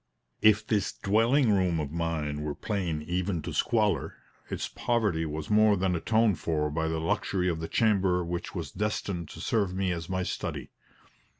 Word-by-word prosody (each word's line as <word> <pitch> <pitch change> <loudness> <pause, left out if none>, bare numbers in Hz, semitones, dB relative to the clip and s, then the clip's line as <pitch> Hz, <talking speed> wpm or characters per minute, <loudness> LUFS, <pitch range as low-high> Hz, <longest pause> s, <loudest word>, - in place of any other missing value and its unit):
If 110 0 +5
this 105 -3 0
dwelling 115 +5 +3
room 90 -4 +2
of 75 -2 -3
mine 80 -3 -2
were 75 -1 -3
plain 90 -8 -2
even 90 0 -2
to - - -5
squalor, - - +1 0.3
its - - -3
poverty 105 -9 0
was 75 +4 -5
more 105 -1 +5
than 90 -1 +1
atoned 110 +2 +2
for 75 -2 -1
by 80 +2 -1
the 80 0 -1
luxury 90 +3 0
of 85 -3 0
the 80 - -4
chamber 95 -5 +2
which 85 0 -4
was - - -4
destined 100 -5 -2
to - - -10
serve 100 -5 0
me 95 -1 0
as 85 -1 -4
my 95 0 -1
study. - - -4
90 Hz, 175 wpm, -28 LUFS, 80-105 Hz, 0.3 s, If